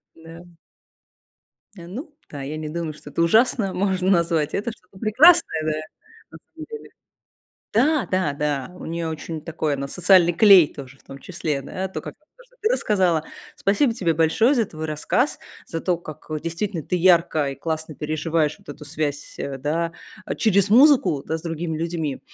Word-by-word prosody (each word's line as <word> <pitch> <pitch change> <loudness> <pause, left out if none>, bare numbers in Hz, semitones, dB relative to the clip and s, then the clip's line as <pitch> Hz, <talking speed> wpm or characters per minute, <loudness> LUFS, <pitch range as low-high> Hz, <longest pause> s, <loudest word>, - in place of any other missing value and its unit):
Да. 165 +1 -12 1.3
Э, 170 -3 -11
ну 285 - -8
да, 145 - -7
я 150 +3 -5
не 155 -1 -5
думаю, 165 0 -4
что 150 0 -13
это 170 - -2
ужасно 210 +2 +3
можно 190 -1 0
назвать. 170 -5 +1
Это 215 +4 -2
что-то 190 -3 -19
прекрасное, 255 - +5
да, 155 - 0 0.6
на - - -11 0.2
самом 320 -1 -9
деле. 450 -1 -9 0.8
Да 275 +5 +2
да 185 -6 +1
да. 145 0 -2
У - - -9
неё 165 0 -3
очень 160 0 -5
такой, 155 -2 -2
она 140 0 -4
социальный 180 0 +4
клей 190 -4 +7
тоже 135 -1 -11
в - - -27
том 135 - -11
числе, 150 -3 -4
да. 185 +7 -5
То, - - -6
как - - -8 0.2
то, - - -18
что - - -29
ты 435 - +2
рассказала. 185 - +1 0.3
Спасибо 225 +4 +1
тебе 175 -7 0
большое 165 - +3
за 230 -5 +1
твой 155 -2 -8
рассказ, 155 - 0 0.3
за 165 - -4
то, 180 0 0
как 155 -3 -11
действительно 170 +1 -3
ты 180 - -2
ярко 170 -4 +3
и 135 - -6
классно 160 +1 -4
переживаешь 155 +1 -1
вот - - -25
эту 145 +1 -9
связь, 145 -1 -4
э, 140 -1 -4
да, 165 +5 -1 0.4
через 200 -3 +3
музыку, 225 - +5
да, 160 - -2
с - - -14
другими 165 -1 -4
людьми. 165 -4 -3
170 Hz, 175 wpm, -22 LUFS, 155-200 Hz, 1.3 s, клей